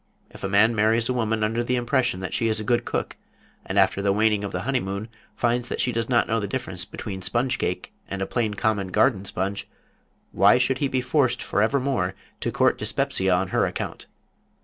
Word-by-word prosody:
If -, -, -13 dB
a 95 Hz, -, -1 dB
man 105 Hz, +4 st, +4 dB
marries 110 Hz, +1 st, +2 dB
a -, -, +2 dB
woman 110 Hz, -2 st, 0 dB
under 115 Hz, +2 st, 0 dB
the 125 Hz, +1 st, 0 dB
impression 120 Hz, -5 st, 0 dB
that 95 Hz, -, -4 dB
she 115 Hz, -, +1 dB
is 110 Hz, -1 st, +1 dB
a -, -, -3 dB
good 120 Hz, +2 st, +1 dB
cook, -, -, -3 dB, 0.5 s
and 95 Hz, -, -4 dB
after 95 Hz, 0 st, +3 dB
the 100 Hz, 0 st, +2 dB
waning 105 Hz, 0 st, +2 dB
of 100 Hz, -, -3 dB
the 90 Hz, -, -3 dB
honeymoon 110 Hz, -4 st, -2 dB, 0.3 s
finds 120 Hz, 0 st, 0 dB
that -, -, -3 dB
she 125 Hz, -, +1 dB
does 115 Hz, 0 st, -2 dB
not 120 Hz, -2 st, +3 dB
know 115 Hz, 0 st, +1 dB
the 100 Hz, -, -3 dB
difference 100 Hz, -6 st, -3 dB
between 95 Hz, -3 st, -6 dB
sponge 120 Hz, +7 st, -1 dB
cake -, -, -3 dB, 0.2 s
and 100 Hz, -, -4 dB
a 95 Hz, -, -1 dB
plain 110 Hz, -2 st, -1 dB
common 105 Hz, -2 st, 0 dB
garden 100 Hz, +2 st, +2 dB
sponge, 95 Hz, +1 st, -3 dB, 0.6 s
why 100 Hz, +5 st, +5 dB
should 125 Hz, +1 st, +1 dB
he 140 Hz, -, +1 dB
be 130 Hz, -1 st, 0 dB
forced 130 Hz, 0 st, +1 dB
forevermore 115 Hz, -3 st, 0 dB, 0.2 s
to -, -, -2 dB
court -, -, +2 dB
dyspepsia 95 Hz, 0 st, 0 dB
on 90 Hz, +1 st, +1 dB
her -, -, +2 dB
account? -, -, -5 dB
110 Hz, 210 wpm, -24 LUFS, 100-125 Hz, 0.6 s, why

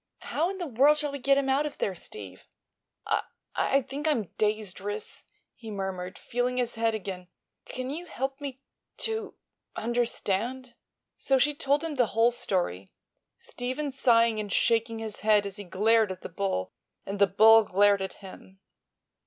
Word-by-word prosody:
How 325 Hz, +4 st, -1 dB
in 390 Hz, -, -5 dB
the 355 Hz, -, -3 dB
world 285 Hz, +2 st, +4 dB
shall 295 Hz, -1 st, -2 dB
we 280 Hz, -, -5 dB
get 275 Hz, +2 st, +3 dB
him 280 Hz, -1 st, +1 dB
out 275 Hz, +3 st, +2 dB
of 295 Hz, -, -8 dB
there, 195 Hz, -, -1 dB
Steve?" 100 Hz, -, -9 dB, 0.6 s
"I—I 275 Hz, -, -1 dB
think 285 Hz, +5 st, -4 dB
I'm 235 Hz, -, +1 dB
dazed, 210 Hz, -3 st, 0 dB
Ris," 205 Hz, +2 st, -5 dB, 0.3 s
he 225 Hz, -2 st, -11 dB
murmured, 190 Hz, -2 st, -4 dB
feeling 245 Hz, +1 st, -2 dB
his 245 Hz, -1 st, 0 dB
head 225 Hz, -1 st, +1 dB
again. 185 Hz, -3 st, -6 dB, 0.4 s
"Can't 255 Hz, +1 st, -5 dB
you 340 Hz, +4 st, -6 dB
help 270 Hz, 0 st, -4 dB
me 275 Hz, -1 st, -7 dB, 0.3 s
to—understand?" 245 Hz, -, -3 dB, 0.5 s
So 270 Hz, -, +2 dB
she 295 Hz, +3 st, +3 dB
told 285 Hz, 0 st, +1 dB
him 315 Hz, -3 st, -4 dB
the 245 Hz, -3 st, +4 dB
whole 230 Hz, +1 st, +5 dB
story, 175 Hz, -, -2 dB, 0.5 s
Stephen 260 Hz, +4 st, -4 dB
sighing 230 Hz, -4 st, +3 dB
and 205 Hz, -1 st, -4 dB
shaking 230 Hz, 0 st, +2 dB
his 220 Hz, -2 st, -5 dB
head 210 Hz, -1 st, +3 dB
as 200 Hz, 0 st, -6 dB
he 205 Hz, -, -6 dB
glared 210 Hz, +3 st, +3 dB
at 185 Hz, -, -8 dB
the -, -, -6 dB
bull 180 Hz, -, -2 dB, 0.3 s
and 200 Hz, +1 st, -5 dB
the 200 Hz, -, +6 dB
bull 220 Hz, +4 st, +7 dB
glared 200 Hz, 0 st, +3 dB
at 190 Hz, -, -3 dB
him. 190 Hz, 0 st, -13 dB
230 Hz, 165 wpm, -28 LUFS, 200-270 Hz, 0.6 s, bull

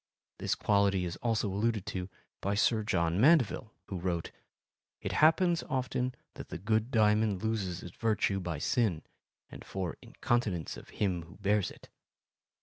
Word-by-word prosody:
This -, -, 0 dB
quality 100 Hz, -3 st, +2 dB
is 85 Hz, 0 st, -4 dB
also 115 Hz, -2 st, 0 dB
alluded 105 Hz, +1 st, 0 dB
to 90 Hz, 0 st, -4 dB, 0.3 s
by 100 Hz, +1 st, 0 dB
Sir 110 Hz, +2 st, +3 dB
John 85 Hz, -3 st, +1 dB
Mandeville, 130 Hz, -6 st, +4 dB
who 95 Hz, -3 st, -5 dB
wrote: 85 Hz, -2 st, -2 dB, 0.7 s
It -, -, -4 dB
happens 170 Hz, +2 st, +4 dB
often 130 Hz, -1 st, -1 dB, 0.2 s
that -, -, -9 dB
the -, -, -5 dB
good 110 Hz, +5 st, 0 dB
diamond 105 Hz, -4 st, +3 dB
loses 100 Hz, -5 st, -2 dB
its 85 Hz, -, -9 dB
virtue 105 Hz, -3 st, +1 dB
by 90 Hz, -4 st, -3 dB
sin 90 Hz, -, +1 dB, 0.5 s
and -, -, -9 dB
for 95 Hz, -3 st, -4 dB
incontinence 105 Hz, -9 st, -1 dB
of -, -, -12 dB
him 95 Hz, -4 st, -1 dB
who 85 Hz, -, -15 dB
bears 100 Hz, 0 st, +1 dB
it. -, -, -14 dB
105 Hz, 150 wpm, -31 LUFS, 90-115 Hz, 0.7 s, Mandeville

